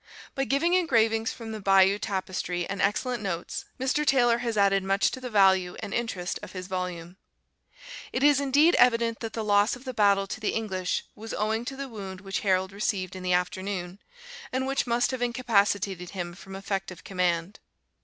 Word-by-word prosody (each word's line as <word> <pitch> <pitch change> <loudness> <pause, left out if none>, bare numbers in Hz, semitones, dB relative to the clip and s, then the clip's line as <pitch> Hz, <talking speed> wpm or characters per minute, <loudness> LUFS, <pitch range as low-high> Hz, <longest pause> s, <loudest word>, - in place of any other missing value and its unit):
By 270 - -1
giving 280 +7 +1
engravings 225 -10 +2
from 225 -2 -8
the 220 - -5
Bayeux 195 0 +4
Tapestry, 185 -3 -3
and 200 - -4
excellent 235 +4 0
notes, 175 -4 -4
Mr. 270 +3 +1
Taylor 240 -5 +3
has 235 -2 -2
added 195 -1 +4
much 195 +1 +2
to 260 - -7
the 250 - -5
value 190 -4 +4
and 200 - -6
interest 195 -7 -2
of - - -10
his 185 -1 -6
volume.] 180 -1 -5 0.9
It 260 - -1
is 290 -1 +5
indeed 285 +5 +4
evident 230 -2 +3
that 225 -1 -5
the 225 - -3
loss 205 +2 +3
of 250 +2 -14
the 255 - -4
battle 200 -3 +3
to 200 - -6
the 215 - -1
English 190 -5 -2
was 225 +2 -7
owing 220 +2 -1
to 270 - -5
the 275 0 -5
wound 195 -6 -7
which 195 0 -3
Harold 190 -2 +1
received 195 -2 -2
in 185 - -7
the 180 0 0
afternoon, 180 +1 -2 0.5
and 260 +1 -1
which 270 -1 -1
must 240 +2 +1
have 260 -1 -4
incapacitated 200 -7 +1
him 175 -3 -5
from 190 +1 -11
effective 195 -2 -4
command. 180 0 -1
205 Hz, 185 wpm, -27 LUFS, 190-240 Hz, 0.9 s, is